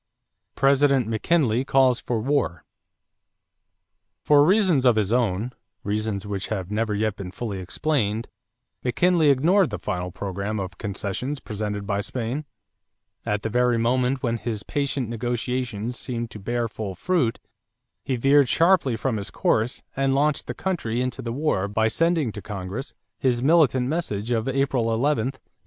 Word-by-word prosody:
=President 135 -1 +4
McKinley 120 +1 +1
Calls 130 -2 +3
for 120 -2 -2
War.= 130 -9 0 1.6
For 145 -1 +6
reasons 185 -5 +4
of 125 -3 +5
his 105 0 +1
own 115 -1 +1 0.3
reasons 105 -1 -2
which 100 -2 -3
have 95 -3 -4
never 110 0 0
yet 110 0 0
been 95 -2 -6
fully 105 0 -5
explained 110 - -1 0.6
McKinley 160 +5 +3
ignored 165 +7 +4
the 105 - -4
final 90 0 -3
program 100 +3 -4
of 90 -2 -6
concessions 105 +8 -3
presented 105 -3 -4
by 100 -1 0
Spain. 125 +7 -3 0.8
At 105 0 -1
the 110 - -1
very 125 +1 +2
moment 125 +3 +1
when 115 -1 0
his 110 -2 -4
patient 140 -3 -1
negotiations 120 0 -3
seemed 120 -2 -4
to 105 - -8
bear 120 +3 -1
full 105 -3 -6
fruit, 160 - +1 0.7
he 130 - -1
veered 135 +2 +4
sharply 165 -8 +3
from 110 +1 -1
his 100 0 -4
course 115 +4 0
and 135 0 +1
launched 145 +1 +1
the - - -4
country 140 -12 -2
into 125 0 -2
the 115 - -4
war 120 -7 0
by 110 +2 +1
sending 165 -1 +1
to 105 - -8
Congress 100 +7 -6 0.2
his 125 -2 +1
militant 135 -5 +4
message 125 -8 -2
of 115 0 0
April 135 -2 +1
11, 115 +1 +1
1898. 135 - -9
120 Hz, 150 wpm, -24 LUFS, 105-135 Hz, 1.6 s, For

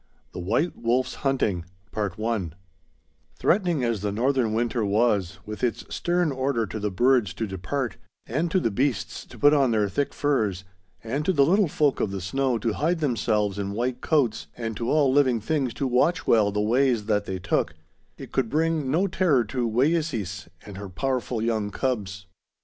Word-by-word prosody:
The - - -7
White 115 - 0
Wolf's 125 +2 0
Hunting 110 -10 0 0.3
Threatening 100 - -3
as 115 -4 0
the 105 0 -1
northern 125 +1 +1
winter 120 0 0
was, 100 -3 +1
with 105 +3 -7
its 120 -2 -1
stern 175 -2 +1
order 130 -3 0
to 110 - -6
the 105 0 -1
birds 120 +1 +2
to 115 - -2
depart, 110 +7 -3 0.3
and 155 +8 -1
to 185 - +2
the 115 - 0
beasts 120 -1 -1
to - - -13
put 145 +1 +5
on 140 -3 +4
their 105 -3 +2
thick 140 +9 -1
furs, 110 -10 0 0.4
and 130 +6 -2
to 190 - +3
the 140 -6 +4
little 195 +4 +3
folk 145 -2 +1
of 105 - 0
the 100 0 -4
snow 130 +7 0
to 115 -1 -1
hide 165 +8 0
themselves 105 -7 0
in 100 0 -3
white 125 +3 -2
coats, 120 - +1
and 115 -2 -4
to 115 +2 -2
all 145 -4 +3
living 130 -4 +3
things 135 +2 -1
to 140 - -2
watch 130 +7 +2
well 105 -3 +4
the 105 - -1
ways 120 0 +2
that 105 -2 +1
they 95 - -3
took, 90 - -1 0.4
it - - -10
could 130 -4 0
bring 155 -1 0
no 165 +8 +2
terror 170 -9 +2
to 120 +1 -2
Wayeeses 125 - 0 0.2
and 100 -2 -9
her 100 0 -7
powerful 125 +2 -2
young 110 -3 0
cubs. 100 -6 -3
120 Hz, 180 wpm, -25 LUFS, 105-140 Hz, 0.4 s, put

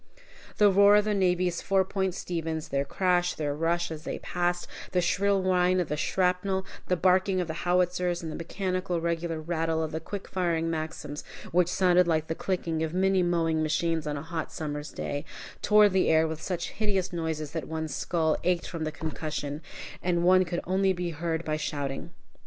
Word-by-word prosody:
The 205 -1 +6
roar 200 +1 +7
of 210 0 +4
the 215 - +1
navy's 180 -3 +1
Four 195 -1 +2
Point 190 -1 -1
Sevens, 165 -4 -3
their 140 0 0
crash, 180 +3 +1
their 145 -2 -1
rush 165 +3 0
as 155 -1 -6
they - - -4
passed, 175 0 -1 0.3
the 180 - +3
shrill 195 +2 +2
whine 185 0 +3
of 175 - -1
the 150 - 0
shrapnel, 185 +3 0 0.2
the 180 - +2
barking 185 +2 +3
of 180 - 0
the 160 - -3 0.2
howitzers, 180 -1 +1
and 160 - -4
the - - -5
mechanical, 185 0 -2
regular 165 -1 -2
rattle 160 0 -1
of 155 - -3
the 160 - -2
quick 195 +4 -6
firing 165 -3 0
Maxims, 155 -2 -4 0.3
which 175 0 +3
sounded 180 -1 +4
like 160 -2 +1
the 160 - -2
clicking 165 -2 -2
of 160 +1 -2
many 190 0 +3
mowing 165 -2 +1
machines 160 0 0
on 145 -1 -2
a 140 - -5
hot 165 -1 -4
summer's 150 -1 -4
day, 145 0 -4 0.4
tore 210 0 +6
the 190 -2 +2
air 160 0 +4
with 160 0 -5
such 175 -2 -3
hideous 195 -4 -1
noises 160 -3 -3
that 160 -5 -4
one's 160 -1 -3
skull 160 -3 +1
ached 180 -1 +1
from 165 -3 -4
the 155 - -2
concussion, 155 -2 -4 0.4
and 175 -1 +1
one 185 +1 +5
could 170 0 -3
only 190 +1 +2
be 175 -1 -3
heard 165 +1 -2
by 155 0 0
shouting. 145 -3 -3
170 Hz, 190 wpm, -28 LUFS, 160-185 Hz, 0.4 s, roar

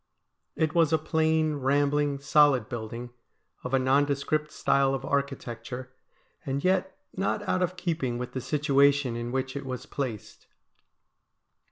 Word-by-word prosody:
It 155 -1 0
was 165 -3 +3
a 160 - +4
plain, 155 0 +1
rambling, 145 +1 +1
solid 140 -4 +4
building, 120 +1 -6 0.5
of 125 - -4
a 135 - +4
nondescript 140 +3 +1
style 135 0 +2
of 135 0 -5
architecture, 130 -2 -3 0.5
and 140 +1 -3
yet 190 0 +1 0.2
not 200 +2 -1
out 185 - +1
of 180 0 -1
keeping 160 -9 -2
with 125 0 -5
the 130 - -4
situation 140 -2 +2
in 120 0 -4
which 130 +1 -2
it 140 - -4
was 130 0 -5
placed. 125 -9 -6
140 Hz, 140 wpm, -27 LUFS, 130-155 Hz, 0.5 s, a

